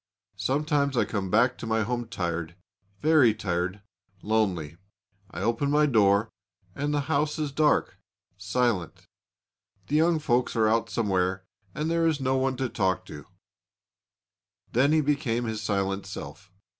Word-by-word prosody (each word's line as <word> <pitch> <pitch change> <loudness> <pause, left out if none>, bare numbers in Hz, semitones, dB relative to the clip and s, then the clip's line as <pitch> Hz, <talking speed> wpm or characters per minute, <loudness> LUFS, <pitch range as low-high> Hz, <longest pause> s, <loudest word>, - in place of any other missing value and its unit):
Sometimes 140 +4 0
I - - +3
come 100 -4 -3
back 120 +5 +2
to - - -6
my 110 -1 +1
home 120 +1 -3
tired, 85 -5 -3 0.5
very 145 -8 +5
tired 95 0 -2 0.4
lonely. 95 -8 0 0.5
I - - -7
open 120 +5 0
my 150 +1 +4
door 105 -4 +3 0.4
and 145 +5 -2
the 145 -1 +1
house 150 +1 0
is 150 -2 -2
dark, 150 +2 +1 0.4
silent. 100 -2 -1 0.8
The 150 - +2
young 165 +1 +3
folks 125 -6 0
are 110 -1 +3
out 115 +1 +1
somewhere 95 -3 0 0.3
and 155 +2 -1
there 165 0 +2
is 155 -3 +1
no 130 0 0
one 130 -1 0
to 130 - -1
talk 95 -5 -1
to.' 75 -5 -10 1.4
Then 135 +5 +3
he 155 0 +4
became 120 -6 -1
silent 100 -2 -2
himself. 95 +1 -9
115 Hz, 145 wpm, -27 LUFS, 95-140 Hz, 1.4 s, very